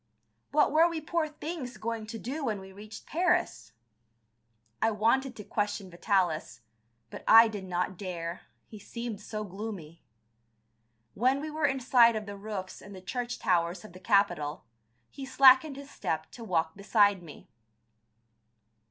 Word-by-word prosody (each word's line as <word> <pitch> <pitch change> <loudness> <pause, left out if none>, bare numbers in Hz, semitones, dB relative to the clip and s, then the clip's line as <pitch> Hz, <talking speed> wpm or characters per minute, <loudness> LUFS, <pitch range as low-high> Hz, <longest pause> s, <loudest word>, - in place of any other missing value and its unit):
What 300 0 +3
were 325 +3 +5
we 335 -1 -3
poor 315 +1 -1
things 300 -4 -6
going 225 -1 -4
to 225 - -6
do 275 +7 -5
when 215 -6 -1
we 190 0 -11
reached 210 +2 -11
Paris? 345 - 0 1.1
I 225 - +4
wanted 230 +5 +1
to 210 - -8
question 205 -2 -3
Vitalis, 175 - -1 0.5
but - - -9
I 225 +1 +9
did 205 -3 -6
not 180 0 -2
dare, 175 -3 -5 0.2
he 215 - -12
seemed 235 0 -6
so 215 0 -5
gloomy. 190 -5 -8 1.1
When 255 +5 +2
we 310 +2 -5
were 310 -1 +1
in 270 -1 -1
sight 240 -2 +5
of 215 -1 -3
the 205 -1 -7
roofs 200 -2 -6
and 200 0 -11
the - - -9
church 245 +4 -4
towers 175 -1 0
of 210 - -13
the 185 - -12
capital, 180 -7 +1 0.5
he 275 - -9
slackened 265 +2 +6
his 280 +1 -10
step 160 0 -3
to 235 - -10
walk 165 -6 -1
beside 205 -1 +3
me. 160 -4 -13
215 Hz, 155 wpm, -29 LUFS, 185-260 Hz, 1.1 s, I